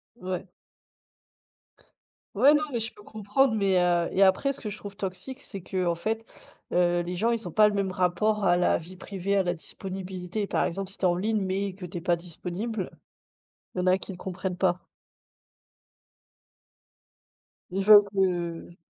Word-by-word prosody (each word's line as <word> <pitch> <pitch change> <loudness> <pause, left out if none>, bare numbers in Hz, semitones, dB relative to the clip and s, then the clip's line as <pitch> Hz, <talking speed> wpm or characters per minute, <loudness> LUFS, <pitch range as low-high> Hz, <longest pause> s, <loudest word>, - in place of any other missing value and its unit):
Ouais. 185 -4 -5 1.8
Ouais, 265 +8 +6
non, 300 - +3
mais 235 - -1
je 225 +2 -3
peux 210 - -16
comprendre, 220 +4 +1
mais, 200 -2 +2
heu 175 -1 +2
et 195 - +5
après 195 +9 +3
ce - - -8
que 215 - -4
je 210 - -6
trouve 200 -1 -9
toxique 200 +7 -6
c'est 195 -3 -7
qu'en 180 -1 -1
fait, 220 +6 -2 0.5
heu, 175 0 +3
les 175 +1 -4
gens, 225 +5 +2
ils 230 -3 -2
ont - - -6
pas 210 +5 +6
le 210 - 0
même 200 -2 0
rapport 195 +4 +1
à 175 - +5
la 175 0 +3
vie 170 +3 -10
privée, 195 +1 -3
à 195 - +3
la 175 -1 0
disponibilité. 185 +2 -5
Par - - +1
exemple, 195 +2 -3
si 195 - -9
tu - - -13
es - - +6
en 175 - +2
ligne 215 +2 0
mais 195 +1 -1
que 185 -1 -8
tu 175 +1 -7
es - - -5
pas 175 0 +2
disponible, 180 +5 -5 0.9
il - - -2
y - - +2
en 180 - -1
a 185 +1 +5
qui 190 - -8
ne 180 - -8
comprennent 185 0 -4
pas. 180 -1 +1 2.8
Ils 190 +2 -1
veulent 210 -1 +10
que 175 -3 -1
190 Hz, 185 wpm, -27 LUFS, 180-210 Hz, 2.8 s, veulent